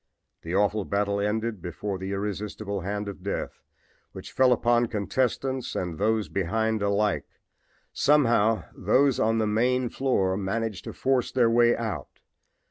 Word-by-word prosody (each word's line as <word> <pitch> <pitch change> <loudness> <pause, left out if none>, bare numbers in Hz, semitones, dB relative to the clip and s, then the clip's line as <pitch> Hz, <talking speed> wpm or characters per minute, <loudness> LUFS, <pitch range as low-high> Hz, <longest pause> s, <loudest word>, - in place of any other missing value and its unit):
The 85 +2 -4
awful 105 +1 +2
battle 100 +1 -1
ended 110 0 -1
before 95 +3 -4
the 95 +1 -5
irresistible 100 0 -4
hand 100 +3 -3
of 100 -2 -7
death, 100 +2 -4 0.5
which - - -9
fell 130 -1 +4
upon 120 0 +3
contestants 130 +4 -1
and 90 -3 -3
those 110 +1 +1
behind 110 +3 -1
alike. 100 0 0 0.7
Somehow 120 -7 +3
those 130 +7 +2
on 115 +1 +2
the 110 - +1
main 120 +4 +1
floor 100 -9 0
managed 105 0 -3
to - - -6
force 130 -2 0
their 120 -3 +3
way 120 0 +4
out. 110 -4 -5
105 Hz, 140 wpm, -26 LUFS, 100-120 Hz, 0.7 s, fell